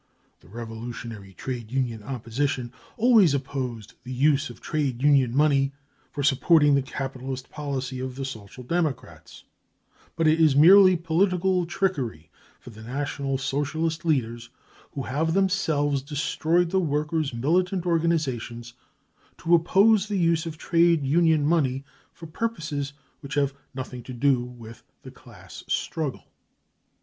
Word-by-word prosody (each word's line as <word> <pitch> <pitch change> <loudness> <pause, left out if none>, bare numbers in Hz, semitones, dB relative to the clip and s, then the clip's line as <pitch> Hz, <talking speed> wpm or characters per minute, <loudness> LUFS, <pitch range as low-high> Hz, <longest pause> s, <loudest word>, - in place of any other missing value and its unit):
The - - -21
revolutionary 115 -1 -8
trade 120 0 -5
union 125 -4 -2
opposition 125 +1 -3 0.2
always 220 - +5
opposed 130 -6 -5
the 125 - -8
use 140 +2 +2
of 120 - -12
trade 140 -5 -2
union 135 -4 +3
money 140 -2 +3 0.4
for 145 - -4
supporting 145 +2 +4
the 140 - +3
capitalist 130 -1 -6
policy 135 -3 -4
of 130 0 -5
the 135 0 -4
Social 115 -1 -9
Democrats; 155 -1 -4 0.7
but 165 - 0
it 160 +1 +3
is 155 -4 +5
merely 185 +4 +7
political 180 +1 +1
trickery 135 - -2 0.3
for 125 - -12
the 110 0 -13
National 135 +2 -3
Socialist 155 +4 -2
leaders, 120 -7 -1 0.4
who 140 - -4
have 160 +6 -1
themselves 160 -8 +1
destroyed 160 +4 0
the 190 - +2
workers 155 -1 -1
5 120 - -7
militant 180 +6 +1
organisations, 140 -9 -1 0.6
to 170 - 0
oppose 195 +5 +4
the 205 -2 -2
use 165 -2 +1
of 160 -1 -6
trade 170 -3 +2
union 160 +1 +3
money 140 -5 +1 0.3
for 165 - -12
purposes 155 -7 -4 0.3
v&iich 140 -1 -7
have 140 -1 0 0.2
nothing 130 -1 -6
to 130 - -9
do 130 0 +2
with 120 -2 -11 0.2
the - - -10
class - - -13
struggle. 155 -5 -3
145 Hz, 135 wpm, -25 LUFS, 130-165 Hz, 0.7 s, merely